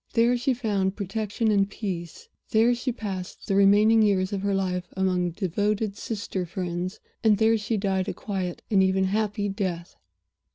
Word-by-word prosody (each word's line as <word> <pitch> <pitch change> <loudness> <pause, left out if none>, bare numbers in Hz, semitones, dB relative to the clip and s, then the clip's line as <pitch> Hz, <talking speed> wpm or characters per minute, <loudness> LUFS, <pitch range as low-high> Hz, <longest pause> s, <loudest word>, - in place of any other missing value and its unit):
There 235 +1 +4
she 250 +2 0
found 200 -5 0
protection 215 +2 -1
and 200 -1 +2
peace 180 -6 -6 0.2
there 225 +2 +4
she 245 +2 -2
passed 195 -6 -6
the - - -1
remaining 205 +3 +5
years 195 -2 +2
of 195 - -2
her 200 0 0
life 180 -2 -1
among 180 -2 +1
devoted 205 +3 -1
Sister 205 -4 -4
friends 180 +1 -4 0.2
and 215 -2 +5
there 220 +1 +4
she 215 +1 -1
died 195 -1 0
a - - -2
quiet 190 -4 -4
and 195 -2 +5
even 190 0 +2
a - - +2
happy 205 0 0
death. 185 -4 -3
200 Hz, 170 wpm, -26 LUFS, 190-215 Hz, 0.2 s, remaining